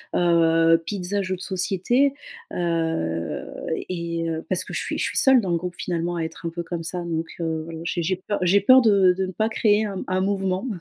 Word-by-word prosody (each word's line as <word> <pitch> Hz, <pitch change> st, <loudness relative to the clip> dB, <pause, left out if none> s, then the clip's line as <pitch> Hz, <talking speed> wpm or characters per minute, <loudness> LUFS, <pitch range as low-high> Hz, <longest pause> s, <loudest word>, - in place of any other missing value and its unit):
heu, 165 Hz, -1 st, +4 dB
pizzas 200 Hz, +2 st, -2 dB
jeux 185 Hz, 0 st, -2 dB
de -, -, -13 dB
société. 195 Hz, +8 st, +1 dB, 0.4 s
Heu, 160 Hz, -, -1 dB, 0.4 s
et, 170 Hz, -2 st, -3 dB
heu, 160 Hz, 0 st, -4 dB
parce 185 Hz, -, +1 dB
que -, -, -9 dB
je -, -, -1 dB
suis -, -, -3 dB
je -, -, -1 dB
suis -, -, -2 dB
seule 265 Hz, -2 st, +5 dB
dans 190 Hz, -4 st, -2 dB
le 170 Hz, -, +2 dB
groupe 180 Hz, +1 st, -5 dB
finalement 175 Hz, 0 st, -2 dB
à 165 Hz, -, -1 dB
être 160 Hz, +1 st, -7 dB
un -, -, 0 dB
peu 170 Hz, +1 st, -5 dB
comme 170 Hz, -1 st, -5 dB
ça, 175 Hz, +1 st, -4 dB
donc, 165 Hz, -1 st, -3 dB
heu, 160 Hz, -1 st, -2 dB
voilà 165 Hz, -1 st, -7 dB
j'ai 170 Hz, +1 st, -2 dB
j'ai 185 Hz, +3 st, 0 dB
peur 205 Hz, -, -1 dB
j'ai 185 Hz, +2 st, +4 dB
peur 255 Hz, +5 st, +7 dB
de 200 Hz, -5 st, +5 dB
de 190 Hz, +1 st, -2 dB
ne -, -, -5 dB
pas 220 Hz, +3 st, 0 dB
créer 215 Hz, -1 st, +2 dB
un 195 Hz, -2 st, -4 dB
un 185 Hz, 0 st, 0 dB
mouvement. 195 Hz, +2 st, -1 dB
180 Hz, 230 wpm, -23 LUFS, 165-195 Hz, 0.4 s, peur